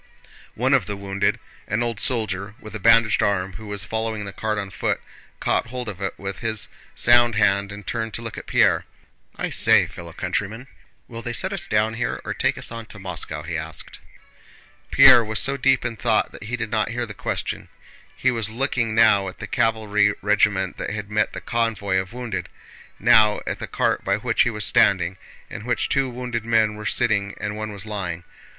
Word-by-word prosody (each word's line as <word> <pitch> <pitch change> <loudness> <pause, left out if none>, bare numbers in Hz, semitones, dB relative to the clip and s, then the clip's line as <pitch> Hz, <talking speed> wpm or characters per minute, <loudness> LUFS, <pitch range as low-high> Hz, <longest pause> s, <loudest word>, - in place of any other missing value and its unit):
One 130 +4 +1
of 125 -9 +3
the 100 - -4
wounded, 100 0 -1 0.3
an 105 +4 0
old 115 -3 -2
soldier 105 -4 -1
with 110 -4 -11
a - - -4
bandaged 115 -1 +5
arm 95 -2 0
who 110 +3 -9
was 100 -1 -4
following 110 +1 -3
the 100 - -7
cart 110 +1 -2
on 100 -2 -4
foot, 95 - -1 0.4
caught - - +1
hold 125 0 -5
of 100 -3 -6
it 95 - -3
with 95 0 -6
his 110 -2 -2 0.3
sound 120 -1 +5
hand 100 -1 +2
and 105 -1 -9
turned 115 -2 -3
to 115 - -4
look 115 -2 -6
at - - -9
Pierre. - - +3 0.5
"I - - -3
say, - - +5
fellow 85 -1 -10
countryman! 100 +7 -3 0.4
Will 115 0 -8
they 120 0 -4
set 190 +9 -1
us 175 -3 -2
down 110 +1 +1
here 115 +1 -2
or - - -2
take - - 0
us - - -1
on 115 -1 -7
to 110 - -11
Moscow?" 80 -5 -5
he 85 +2 -5
asked. 80 -2 -6 0.9
Pierre 120 - +8
was 110 -1 +1
so 135 - +3
deep 135 -2 +2
in 115 -1 -3
thought 110 -2 +1
that - - -10
he 120 +3 -2
did 110 -2 -4
not 110 -1 +1
hear 120 +1 -2
the 105 - -8
question. - - -4 0.5
He 130 - +2
was 115 -3 0
looking 115 -1 -1
now 100 -4 +5
at 95 - -7
the - - -6
cavalry 105 -2 +1
regiment 100 -2 +2
that - - -4
had 105 0 -5
met 105 0 +1
the - - -6
convoy 110 -5 0
of 95 +1 -2
wounded, 110 -8 -5 0.5
now 105 -1 +5
at - - -3
the - - -5
cart - - 0
by - - +1
which - - +1
he - - +4
was - - -1
standing, 90 +2 +3 0.3
in 100 - -8
which 125 +1 -1
two 135 -1 +1
wounded 120 -2 -4
men 110 -2 +2
were 105 0 -5
sitting 100 -4 +1
and 105 +1 -3
one 110 0 -4
was 100 0 -5
lying. 90 -6 -4
110 Hz, 205 wpm, -23 LUFS, 100-115 Hz, 0.9 s, Pierre